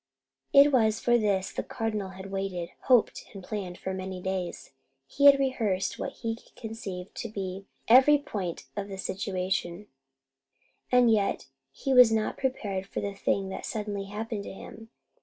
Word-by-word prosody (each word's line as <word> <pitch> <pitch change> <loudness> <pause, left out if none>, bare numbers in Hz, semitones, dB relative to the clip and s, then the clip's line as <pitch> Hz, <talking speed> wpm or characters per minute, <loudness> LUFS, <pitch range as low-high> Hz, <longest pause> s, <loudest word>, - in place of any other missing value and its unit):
It 280 +1 +7
was 220 -4 +3
for 240 0 +3
this 200 -3 0
the - - -3
Cardinal 215 -3 -3
had 190 +1 -9
waited, 195 -3 -3
hoped, 250 -4 +3
and 195 - -8
planned 190 -3 -5
for 190 - -4
many 185 0 -5
days. 185 -1 -4 0.3
He 280 - 0
had 280 -1 +10
rehearsed 225 -8 -1
what - - -3
he 230 -1 -4 0.2
conceived 205 -5 -7
to 230 - -4
be 195 -1 -5 0.2
every 265 +5 +7
point 200 - -5
of 200 -1 -3
the 195 -1 -7
situation, 185 -1 -2 1.1
and 250 -2 +5
yet 205 -3 0 0.2
he 270 - -2
was 250 -3 +8
not 220 -1 0
prepared 205 -8 -2
for - - -4
the 200 0 -3
thing 195 0 -1
that - - -6
suddenly 205 -2 -3
happened 210 +1 -4
to - - -6
him. 225 +3 -11
205 Hz, 160 wpm, -28 LUFS, 190-230 Hz, 1.1 s, had